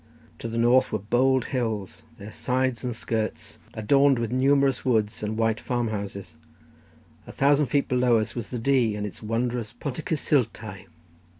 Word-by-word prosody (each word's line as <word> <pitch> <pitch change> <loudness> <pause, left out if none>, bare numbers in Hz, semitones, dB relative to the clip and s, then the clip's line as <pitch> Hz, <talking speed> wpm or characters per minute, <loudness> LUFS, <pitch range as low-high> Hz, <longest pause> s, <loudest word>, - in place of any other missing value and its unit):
To - - -5
the 115 0 -4
north 120 +2 +4
were - - +1
bold 125 +5 +2
hills, 110 -6 -2 0.2
their 105 +1 -9
sides 130 -1 -1
and 125 -2 -3
skirts 110 -1 -4 0.2
adorned 135 +5 +4
with 115 -1 -2
numerous 135 +1 +2
woods 110 -4 0
and 110 +1 -3
white 115 -1 +1
farmhouses; 100 -7 -4 0.9
a - - -8
thousand 145 +1 +3
feet 140 +1 +1
below 125 -2 +3
us 110 +1 -2
was 120 -3 -5
the 125 - -4
Dee, 120 -3 +2
and 105 0 -3
its 100 - -8
wondrous 115 0 -2
Pont 125 +1 -5
y - - -3
Cysultau. 110 - -1
120 Hz, 165 wpm, -25 LUFS, 110-130 Hz, 0.9 s, north